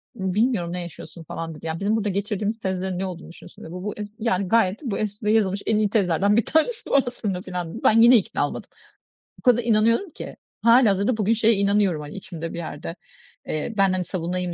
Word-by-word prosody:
bilmiyorum 190 -2 0
ne 180 - -3
yaşıyorsun." 170 0 -10
falan 165 0 -6
dedi, 150 - -12
"Yani, 160 0 -3
bizim 205 +2 +1
burada 210 -2 0
geçirdiğimiz 205 +2 -2
tezlerin 190 -2 -2
ne 190 - -1
olduğunu 180 -2 -7
düşünüyorsun?" 170 +1 -13
dedi, 160 - -9
"Bu 180 +1 -7
bu, 210 - -3
ez 210 0 -5
yani, 200 -4 0
gayet 210 -1 +2
bu 230 -7 -2
es 210 -1 -4
bu 210 - -4
yazılmış 200 -3 +2
en 220 - +2
iyi 210 -1 +2
tezlerden 200 -1 +2
1 230 - +2
tanesi 445 +10 0
bu - - +1
aslında." 205 -7 -3
filan 180 -3 -5
dedi. - - -8
Ben 225 +1 +5
yine 240 +2 +8
ikna 200 - 0
olmadım. - - -8 0.7
O - - -16
kadar 245 -2 +4
inanıyorum 230 - +2
ki. - - -8 0.3
Hâlihazırda 230 -2 +4
bugün 215 +1 +2
şeye 225 0 +3
inanıyorum, 200 -4 +2
hani, 150 0 -9
içimde 165 -4 -7
bir - - -6
yerde, 165 0 -6 0.5
eee, 155 +9 -2
ben, 195 -1 +4
hani, 185 -1 -1
savunayım 180 0 -3
200 Hz, 215 wpm, -23 LUFS, 180-220 Hz, 0.7 s, yine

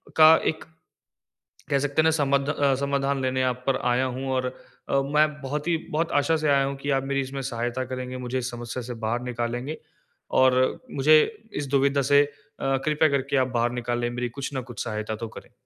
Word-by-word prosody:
का 160 0 +9 0.2
एक 160 - -11 1.1
कह 140 - +2
सकते 145 +2 +1
हैं - - 0
ना 160 - +4
समध 140 -1 +1
अ 140 -2 +2
समाधान 140 -1 0
लेने 130 0 0
आप 125 0 -1
पर 135 -1 +3
आया 125 +2 +2
हूँ। 130 +1 -4
और 130 -1 0 0.4
अ, 135 - +3
मैं 150 +3 +3
बहुत 145 +3 -4
ही 170 - +3 0.2
बहुत 160 +2 0
आशा 160 +2 +1
से 155 -1 0
आया 140 -1 +4
हूँ 140 - -3
कि 145 - -3
आप 135 -1 +1
मेरी 140 0 0
इसमें 135 +1 -5
सहायता 120 0 -3
करेंगे, 130 0 -5
मुझे 125 0 -3
इस 125 0 -4
समस्या 120 +1 -5
से 120 +1 -6
बाहर 120 +2 0
निकालेंगे। 125 +4 -3 0.6
और 130 -1 +5 0.4
मुझे 150 +3 +5 0.4
इस 145 - -3
दुविधा 140 +1 +2
से 140 +2 +5
अ, 145 -1 -4
कृपया 155 0 +3
करके 140 0 0
आप 130 - +3
बाहर 120 -1 0
निकालें। 120 0 -2
मेरी 120 0 -3
कुछ 140 +4 -6
न 130 - -1
कुछ - - -4
सहायता 110 -1 -3
तो 115 +1 -5
करें। - - -12
135 Hz, 205 wpm, -25 LUFS, 125-140 Hz, 1.1 s, का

